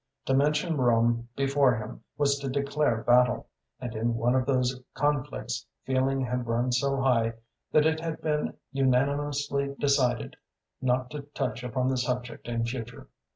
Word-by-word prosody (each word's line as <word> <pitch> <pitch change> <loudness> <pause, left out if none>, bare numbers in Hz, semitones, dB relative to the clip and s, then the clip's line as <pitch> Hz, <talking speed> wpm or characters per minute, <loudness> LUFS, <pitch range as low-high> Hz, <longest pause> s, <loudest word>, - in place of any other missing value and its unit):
To 135 - +1
mention 150 +4 +2
Rome 120 -1 +2
before 135 -2 +3
him 110 +1 -7 0.2
was 140 -1 +2
to 140 -1 -3
declare 140 -3 0
battle, 125 -1 +4 0.3
and 120 -3 -5
in 115 +1 0
one 120 +2 +2
of 130 0 +1
these 130 -2 +2 0.2
conflicts 135 -5 -1 0.2
feeling 135 +1 +1
had 125 -1 -2
run 120 +2 +1
so 135 +2 +1
high 115 -4 +2 0.4
that 155 0 +4
it 160 0 +2
had 165 -1 -4
been 150 -1 -1 0.2
unanimously 140 +1 +1
decided 130 -4 +1 0.4
not 125 0 0
to 150 -1 -5
touch 115 +3 -2
upon 125 +1 -1
the 130 - 0
subject 125 -1 -3
in 115 -1 -1
future. 120 -1 -6
130 Hz, 155 wpm, -28 LUFS, 120-140 Hz, 0.4 s, battle